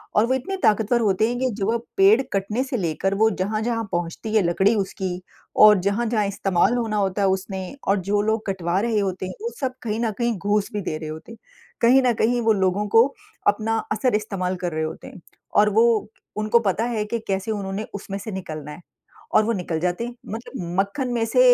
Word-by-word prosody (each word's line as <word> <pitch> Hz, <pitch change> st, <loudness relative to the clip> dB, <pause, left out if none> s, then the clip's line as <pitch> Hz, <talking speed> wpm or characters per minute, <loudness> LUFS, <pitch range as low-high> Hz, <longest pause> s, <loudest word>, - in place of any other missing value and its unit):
और 210 Hz, -, +5 dB
वो 260 Hz, -, +2 dB
इतने 320 Hz, +10 st, -2 dB
ताकतवर 220 Hz, +3 st, +3 dB
होते 210 Hz, 0 st, +2 dB
हैं 245 Hz, -, -2 dB
कि 260 Hz, 0 st, +1 dB
जो 195 Hz, -, -1 dB
वो 235 Hz, -, +1 dB, 0.2 s
पेड़ 200 Hz, +6 st, +6 dB
कटने 205 Hz, +5 st, 0 dB
से 265 Hz, -2 st, -3 dB
लेकर 185 Hz, +1 st, -1 dB
वो 220 Hz, -, +6 dB
जहाँ-जहाँ 220 Hz, +4 st, -1 dB
पहुँचती 175 Hz, +5 st, -3 dB
है 215 Hz, -, +5 dB
लकड़ी 190 Hz, +5 st, +3 dB
उसकी 190 Hz, -2 st, -2 dB, 0.6 s
और 210 Hz, -2 st, +7 dB
जहाँ-जहाँ 220 Hz, 0 st, +1 dB
इस्तेमाल 195 Hz, +2 st, +1 dB
होना 225 Hz, -3 st, -1 dB
होता 195 Hz, 0 st, 0 dB
है 195 Hz, -, +3 dB
उसने 190 Hz, 0 st, -1 dB, 0.3 s
और 195 Hz, 0 st, +3 dB
जो 205 Hz, 0 st, +3 dB
लोग 220 Hz, +1 st, 0 dB
कटवा 185 Hz, -1 st, 0 dB
रहे 225 Hz, -2 st, +1 dB
होते 190 Hz, -2 st, -2 dB
हैं 185 Hz, -, -5 dB
वो 465 Hz, -, -2 dB
सब 260 Hz, -3 st, -1 dB
कहीं 220 Hz, -1 st, -2 dB
न 230 Hz, -2 st, 0 dB
कहीं 235 Hz, -3 st, 0 dB
घूस 205 Hz, +2 st, 0 dB
भी 205 Hz, -, -2 dB
दे 155 Hz, -, -3 dB
रहे 155 Hz, -1 st, -6 dB
होते 160 Hz, +8 st, -9 dB
हैं। 230 Hz, -, -11 dB, 0.4 s
कहीं 250 Hz, +3 st, +6 dB
न 245 Hz, -, +3 dB
कहीं 240 Hz, +2 st, +2 dB
वो 225 Hz, -1 st, +3 dB
लोगों 195 Hz, +1 st, +1 dB
को 230 Hz, +2 st, +8 dB, 0.4 s
अपना 225 Hz, +1 st, +2 dB
असर 220 Hz, +2 st, +1 dB
इस्तेमाल 195 Hz, -4 st, -2 dB
कर 175 Hz, -, -1 dB
रहे 155 Hz, -, -1 dB
होते 155 Hz, -, -6 dB
हैं -, -, -12 dB, 0.3 s
और 210 Hz, 0 st, +5 dB
वो, 220 Hz, 0 st, +3 dB, 0.3 s
उनको 215 Hz, +2 st, +3 dB
पता 210 Hz, -1 st, 0 dB
है 230 Hz, -3 st, -1 dB
कि 230 Hz, +2 st, -2 dB
कैसे 195 Hz, +3 st, -1 dB
उन्होंने 200 Hz, 0 st, -3 dB
उसमें 195 Hz, -1 st, -5 dB
से 210 Hz, +2 st, -6 dB
निकलना 155 Hz, -6 st, -6 dB
है। 150 Hz, +4 st, -10 dB, 0.5 s
और 215 Hz, -, +6 dB
वो 230 Hz, -, +1 dB
निकल 175 Hz, -5 st, -2 dB
जाते 180 Hz, +6 st, -1 dB
हैं। 240 Hz, -, -7 dB, 0.2 s
मतलब 230 Hz, +4 st, -7 dB, 0.3 s
मक्खन 200 Hz, +7 st, 0 dB
में 230 Hz, -1 st, +1 dB
से 230 Hz, -, +1 dB
210 Hz, 215 wpm, -23 LUFS, 190-230 Hz, 0.6 s, को